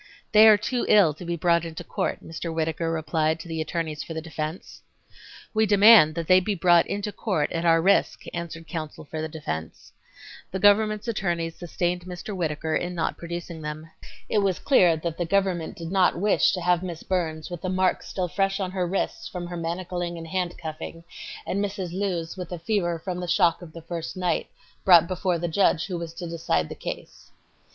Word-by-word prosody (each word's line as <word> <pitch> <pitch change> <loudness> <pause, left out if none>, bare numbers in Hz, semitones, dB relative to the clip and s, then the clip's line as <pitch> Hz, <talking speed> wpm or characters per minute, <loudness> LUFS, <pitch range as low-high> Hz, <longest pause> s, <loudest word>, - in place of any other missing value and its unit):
"They 215 +1 +8
are 215 -1 +8
too 245 +4 -2
ill 195 -8 +6
to 155 - -11
be 170 0 -2
brought 170 0 +2
into 165 -1 -6
court," - - -3
Mr. 165 +1 -5
Whittaker 160 0 -1
replied 160 0 0
to 160 - -9
the 160 -1 -3
attorneys 155 -1 -3
for 165 - -7
the - - -2
defense. 160 +1 -6 0.7
"We 220 0 +3
demand 205 -6 +7
that 170 -1 -2
they 185 +2 +6
be 200 +2 -2
brought 175 -1 +4
into 205 +1 -3
court 190 -9 -1
at 165 0 -2
our 165 -1 +4
risk," 200 +2 +3
answered 165 -1 -6
counsel 155 -2 -6
for 155 +2 -5
the 160 - -2
defense. 80 - -6 0.6
The 190 - -3
government's 210 +2 +3
attorneys 170 -7 -1
sustained 175 0 -2
Mr. 185 +3 -6
Whittaker 160 -2 -1
in 175 0 -2
not 165 - -1
producing 170 -1 -6
them. 155 +2 -6 0.4
It 210 - +2
was 195 -3 +1
clear 180 - +4
that 165 +1 -4
the - - +1
government 190 -3 0
did 165 0 -6
not 190 -2 +4
her - - -7
wish 205 +2 +3
to 185 - -2
have 175 0 +2
Miss 175 -3 -6
Burns 165 -3 -2
with 175 -2 -6
the 185 - -2
marks 185 0 +1
still 185 -2 -2
fresh 195 +2 0
on 185 -2 -2
wrists 185 0 -2
from 180 -1 -6
her 175 0 -6
manacling 175 +1 -3
and 165 - -7
handcuffing, 165 -2 -4 0.4
and 200 +2 -1
Mrs. 195 -3 -4
Lewes 180 -4 -2
with 180 -2 -7
a 175 - -3
fever 175 -2 0
from 180 +2 -5
the 180 - -4
shock 170 0 +3
of 170 -3 -10
the 165 0 -10
first 165 +1 -5
night, 180 -1 -1 0.3
brought 170 -3 +7
before 180 -1 0
the 175 +1 -2
judge 165 -1 +2
who 180 -3 -4
was 165 -1 -7
to 180 - -6
decide 160 - -1
the - - -5
case. - - -8
175 Hz, 200 wpm, -25 LUFS, 165-185 Hz, 0.7 s, They